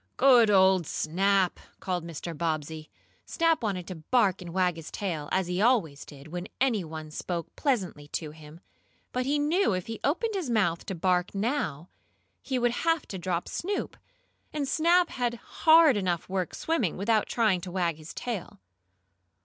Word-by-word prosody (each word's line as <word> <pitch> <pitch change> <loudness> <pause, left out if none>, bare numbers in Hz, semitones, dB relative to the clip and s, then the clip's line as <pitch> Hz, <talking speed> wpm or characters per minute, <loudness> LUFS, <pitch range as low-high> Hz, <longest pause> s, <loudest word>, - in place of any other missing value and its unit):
"Good 250 -4 +6
old 190 -4 +4
Snap!" 190 +3 +1 0.2
called 180 -3 -2
Mr. 170 0 -6
Bobbsey. 155 -1 -3 0.3
Snap 330 -1 +1
wanted 195 -6 -2
to 185 - -6
bark 190 +3 +1
and 175 -2 -7
wag 180 -1 +1
his 165 -1 -8
tail, 165 -7 -4
as 190 -1 +1
he 180 +2 -2
always 205 - +2
did 145 +1 -13
when 175 +3 -5
any 240 -7 +2
one 155 -1 -8
spoke 170 +1 -5
pleasantly 190 - -1
to 150 +1 -4
him, 155 +2 -14 0.5
but 250 +1 -2
he 290 +2 +2
knew 300 - +2
if 185 -1 -2
he 225 -1 -6
opened 435 +10 0
his 370 -9 -3
mouth 185 -8 +1
to 190 - -3
bark 180 +2 0
now, 200 - -2 0.5
he 265 - -2
would 240 -1 +2
have 330 -1 +1
to 190 - -5
drop 175 -1 -2
Snoop. 400 +4 -3 0.6
And 295 -2 -2
Snap 340 +4 +3
had 245 -2 -1
hard 315 +3 +5
enough 180 -4 -1
work 185 -2 -2
swimming, 265 - -1
without 215 +2 +1
trying 215 -6 +2
to 180 0 -7
wag 175 -4 0
his 155 0 -10
tail. 230 -7 -5
190 Hz, 170 wpm, -28 LUFS, 170-250 Hz, 0.6 s, Good